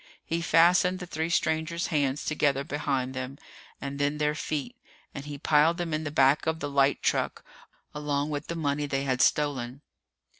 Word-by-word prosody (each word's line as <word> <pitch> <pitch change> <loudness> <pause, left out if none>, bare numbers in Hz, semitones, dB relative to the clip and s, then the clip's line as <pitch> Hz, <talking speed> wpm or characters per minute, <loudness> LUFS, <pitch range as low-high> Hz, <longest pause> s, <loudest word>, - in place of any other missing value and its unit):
He 165 +1 -2
fastened 175 +3 +4
the 180 - -7
three 160 -1 -3
strangers' 160 0 0
hands 145 -1 0
together 145 -3 +1
behind 140 -3 -2
them, 130 +1 -5 0.4
and 140 0 -5
then 145 +1 0
their 150 0 +1
feet, 155 - -4 0.4
and 140 - -7
he 145 -1 -6
piled 155 +3 +3
them 170 -2 -3
in 155 +1 -2
the - - -2
back 140 +1 +3
of 160 0 0
the 145 -3 -4
light 140 0 +2
truck, - - 0 0.5
along 150 0 -2
with 145 +1 -4
the 170 - -4
money 145 -2 -1
they 135 -1 -1
had 130 -2 0
stolen. 140 -3 +1
150 Hz, 180 wpm, -27 LUFS, 140-160 Hz, 0.5 s, fastened